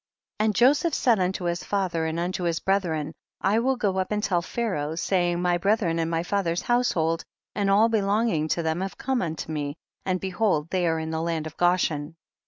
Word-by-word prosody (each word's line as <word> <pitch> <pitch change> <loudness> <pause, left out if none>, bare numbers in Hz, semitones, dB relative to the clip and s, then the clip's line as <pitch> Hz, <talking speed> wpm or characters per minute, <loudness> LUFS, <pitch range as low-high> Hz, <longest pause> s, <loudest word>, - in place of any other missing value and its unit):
19. 215 - +3
And 210 - -2
Joseph 285 - +4
said 235 -5 +3
unto 185 +1 -1
his 175 0 -1
fa 200 -2 0
ther 165 -2 -2
and 160 +1 -2
unto 180 +1 -2
his 170 -1 0
brethren, 165 -6 0 0.3
I 205 +3 +2
will 260 +3 +1
go 200 -6 0
up 185 - -2
and 210 0 0
tell 180 -4 +1
Pharaoh, 170 -8 -2
saying, 175 0 +1
my 175 0 +1
bre 200 +4 +3
thren 170 -6 -1
and 165 - -1
my 165 0 0
father's 175 -2 -1
household 170 -10 +1 0.3
and 200 -1 0
all 205 +3 +5
belonging 210 -6 +1
to 170 +2 -1
them 160 +2 -1
have 190 0 -4
come 265 -1 -1
unto 160 -2 -4
me, 145 -2 -3 0.3
and 185 -1 0
behold 185 -4 0
they 180 -2 +1
are 160 0 +1
in 160 0 -3
the 160 0 -2
land 165 -2 -2
of 155 - -7
Goshen. 165 -3 +1
180 Hz, 215 wpm, -25 LUFS, 165-205 Hz, 0.3 s, all